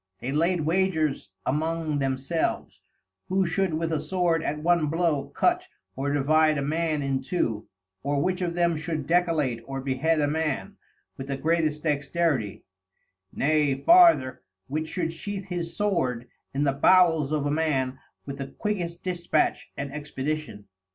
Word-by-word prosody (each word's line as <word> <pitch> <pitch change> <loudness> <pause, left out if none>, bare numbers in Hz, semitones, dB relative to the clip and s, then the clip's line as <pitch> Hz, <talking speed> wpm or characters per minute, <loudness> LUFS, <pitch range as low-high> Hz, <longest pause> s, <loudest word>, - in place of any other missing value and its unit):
They 130 - -4
laid 170 +4 +1
Wagers 160 - 0 0.2
among 155 +1 -1
themselves, 135 +4 -2 0.5
who 190 +1 +2
should 170 0 0
with 165 +1 -1
a 155 - +1
Sword 165 +1 0
at 150 - -2
one 165 0 +2
blow 160 -3 0
cut, 360 +1 +1 0.3
or 140 +2 -2
divide 155 +2 +3
a 140 - -1
Man 155 0 0
in 135 -1 -1
two; 120 - -2 0.3
or 140 +1 0
which 185 +5 0
of 170 -1 -1
them 170 -1 +2
should 155 -2 -3
decollate 160 -8 +1
or 135 +2 -5
behead 135 +5 0
a 145 - +2
Man, 155 -1 -2 0.4
with 135 - -6
the 140 -1 -2
greatest 155 0 0
dexterity; 145 - 0 0.7
nay 150 -1 +2
farther, 335 - +5 0.2
which 155 +7 -3
should 165 -2 -2
sheath 195 +3 -6
his 170 -2 -4
Sword 130 - 0 0.2
in 140 +2 -1
the 140 -2 +2
Bowels 160 -1 +4
of 150 -2 0
a 145 - 0
Man 135 -5 0 0.3
with 140 0 -7
the 135 - -4
quickest 175 +1 -4
dispatch 175 -2 0
and 140 -1 -4
expedition. 150 -5 -4
155 Hz, 150 wpm, -26 LUFS, 140-170 Hz, 0.7 s, farther